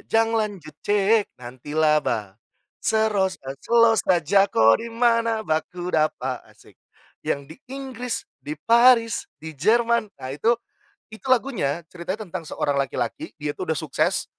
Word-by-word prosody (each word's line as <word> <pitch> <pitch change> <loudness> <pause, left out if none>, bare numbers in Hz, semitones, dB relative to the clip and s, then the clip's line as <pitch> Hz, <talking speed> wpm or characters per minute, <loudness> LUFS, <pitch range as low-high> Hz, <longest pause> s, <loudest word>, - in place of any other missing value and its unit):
jang 225 0 +2
lanjut 200 -8 -4
chat 205 +1 +3
nanti 125 +4 -9
laba, 150 -10 +1 0.4
seros 215 -4 +1
a 135 0 -6
selow 230 - +4
saja 195 +2 +3
ko 115 - +4
di 230 - -6
mana 230 -1 +1
bakudapa, 160 -2 -1
asik - - -21 0.5
yang 140 - 0
di 160 - -11
Inggris, 255 -2 -5 0.2
di 150 - -6
Paris, 230 - +4 0.2
di 160 - -6
Jerman. 235 - +3
Nah 130 - -7
itu, 220 - +2 0.6
itu 220 - -11
lagunya 220 - +1
ceritanya 185 +5 -5
tentang 170 -2 -6
seorang 145 - -1
laki-laki, 295 - -3
dia 150 -1 -3
tuh 185 - -6
udah 160 - +1
sukses, 155 -4 0
200 Hz, 140 wpm, -23 LUFS, 155-230 Hz, 0.6 s, selow